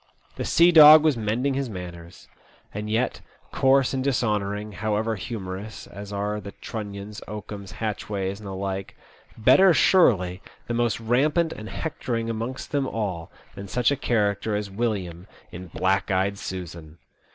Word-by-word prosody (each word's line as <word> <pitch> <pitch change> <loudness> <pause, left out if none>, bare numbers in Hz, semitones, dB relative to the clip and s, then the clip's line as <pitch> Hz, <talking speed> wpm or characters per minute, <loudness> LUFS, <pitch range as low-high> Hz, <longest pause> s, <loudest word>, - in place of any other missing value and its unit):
The - - -4
sea 170 +2 +5
dog 155 -1 +10
was 155 -3 +3
mending 115 +5 -1
his 135 -1 -2
manners. 85 -3 -9 0.5
And 105 +1 -5
yet, 115 +4 -1 0.3
coarse 135 0 +3
and 130 -1 -1
dishonouring, 105 -5 -1
however 110 +2 -1
humorous, 100 0 -6
as 100 +2 -10
are 105 +1 -2
the 100 - -9
Trunnions, 105 -2 -7
Oakums, 105 -3 -8
Hatchways, 100 -2 -3
and 105 - -10
the 95 - -5
like, 95 0 -4 0.4
better 155 - +6
surely 95 - +3 0.2
the 120 - -3
most 120 -1 0
rampant 145 +8 +1
and 110 +1 -8
hectoring 115 -7 -3
amongst 115 +4 -5
them 140 -2 0
all 95 -9 -4 0.2
than 100 0 -8
such 125 +6 +1
a - - +2
character 105 -4 0
as 105 -1 -3
William 95 -5 -3 0.2
in 90 +1 -8
"Black 95 +2 0
ey'd 100 +1 0
Susan.' 85 -4 -7
105 Hz, 150 wpm, -25 LUFS, 95-120 Hz, 0.5 s, dog